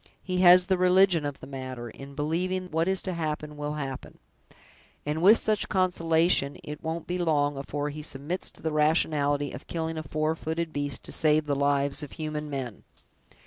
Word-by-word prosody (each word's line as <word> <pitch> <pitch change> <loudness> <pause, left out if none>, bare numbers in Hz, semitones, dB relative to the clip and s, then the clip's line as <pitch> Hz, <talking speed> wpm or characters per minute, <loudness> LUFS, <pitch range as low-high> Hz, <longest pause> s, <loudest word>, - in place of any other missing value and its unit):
He 185 -1 -2
has 180 0 +8
the 185 -1 +1
religion 180 -3 +4
of 140 -1 -6
the - - -8
matter, 130 -3 -6
in 140 +3 -11
believing 180 +5 -2
what 165 +2 +1
is 190 -1 +1
to 185 - -2
happen 150 -2 -3
will 150 0 -4
happen; 135 -3 -6 0.9
and 150 +2 -2
with 205 +6 +8
such 215 -2 +1
a - - -14
consolation, 165 -5 +2
it 150 0 -8
won't 160 0 -3
be 180 +1 -3
long 145 -4 +1
afore 145 +1 -3
he 150 +1 -7
submits 150 +4 -4
to - - -17
the 160 - -1
rationality 150 -2 +1
of 125 - -9
killing 160 -1 -3
a - - -3
four 155 +1 -1
footed 160 0 -3
beast 145 -3 -2
to - - -7
save 155 0 +3
the 145 - 0
lives 140 +1 +1
of 145 - -8
human 155 -1 -4
men. 130 -6 -5
155 Hz, 190 wpm, -27 LUFS, 145-170 Hz, 0.9 s, has